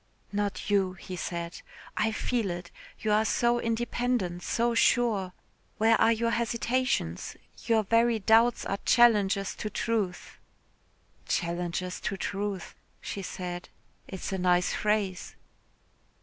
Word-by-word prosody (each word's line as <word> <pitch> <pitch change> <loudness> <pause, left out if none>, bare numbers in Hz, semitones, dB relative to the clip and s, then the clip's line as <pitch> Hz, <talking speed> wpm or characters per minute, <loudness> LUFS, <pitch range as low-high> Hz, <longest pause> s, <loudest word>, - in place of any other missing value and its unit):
"Not 205 0 -2
you," 190 -2 +2
he 185 0 -8
said. 170 -1 -5 0.3
"I 220 +1 +1
feel 225 -2 -1
it. 175 0 -6 0.3
You 215 - 0
are 215 +1 +4
so 240 +2 +2
independent, 230 -5 -1
so 235 +5 0
sure. 225 -5 +2 0.5
Where 225 +1 +5
are 225 - +6
your 230 +1 +1
hesitations? 235 - -1 0.3
Your 225 -2 +3
very 230 +2 +3
doubts 225 +3 +4
are 195 - -2
challenges 205 -5 +4
to 215 - -5
truth." 210 -4 -2 0.9
"Challenges 175 +1 -2
to 195 - -2
truth," 200 -2 -3 0.3
she 200 - -5
said. 180 -1 -6 0.4
"It 190 - -7
is - - -3
a 190 - -1
nice 180 0 +2
phrase." 210 -3 -1
205 Hz, 125 wpm, -28 LUFS, 185-230 Hz, 0.9 s, are